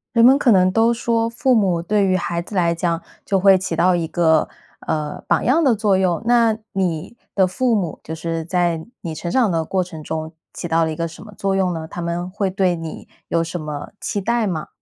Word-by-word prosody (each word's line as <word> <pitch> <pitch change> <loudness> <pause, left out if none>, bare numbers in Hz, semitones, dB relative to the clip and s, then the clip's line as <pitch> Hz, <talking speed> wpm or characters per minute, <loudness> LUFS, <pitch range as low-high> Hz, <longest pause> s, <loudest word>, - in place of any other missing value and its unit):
人 230 - +5
们 265 +3 +7
可 260 - +3
能 185 -1 +4
都 225 +3 +3
说： 230 -1 0
“父 250 +2 +1
母 190 -7 +2
对 200 +3 +1
于 185 - +2
孩 170 -1 -1
子 190 +4 -9
来 170 -2 +2
讲， 170 0 -1 0.2
就 195 - +1
会 195 0 +6
起 185 -2 -3
到 180 +2 +3
一 165 -1 -2
个， 160 -1 +2 0.4
呃， 150 -1 -2
榜 - - +2
样 285 +7 +3
的 265 -7 +4
作 205 -2 +2
用。” 180 -3 +1
那 230 -2 +3
你 185 +2 -2 0.2
的 190 - +4
父 230 +6 +1
母， 180 -7 -2
就 160 - -6
是 165 0 -3
在 175 -2 0 0.2
你 165 - -5
成 170 +2 -5
长 230 +1 +2
的 165 -1 0
过 185 +3 0
程 170 -3 -9
中， 160 +1 -4 0.2
起 175 - -6
到 165 0 +3
了 160 - -2
一 - - -6
个 165 - -2
什 165 -1 -9
么 215 -1 -12
作 195 0 0
用 185 -2 +1
呢？ 160 -1 -5
他 175 - -7
们 170 +1 -3
会 195 +1 -1
对 185 -2 +1
你 165 -1 -8 0.2
有 165 -1 +1
什 170 +2 -5
么 150 -2 -6
期 205 - -3
待 235 +2 +1
吗？ 160 -5 -3
180 Hz, 250 characters per minute, -20 LUFS, 165-210 Hz, 0.4 s, 们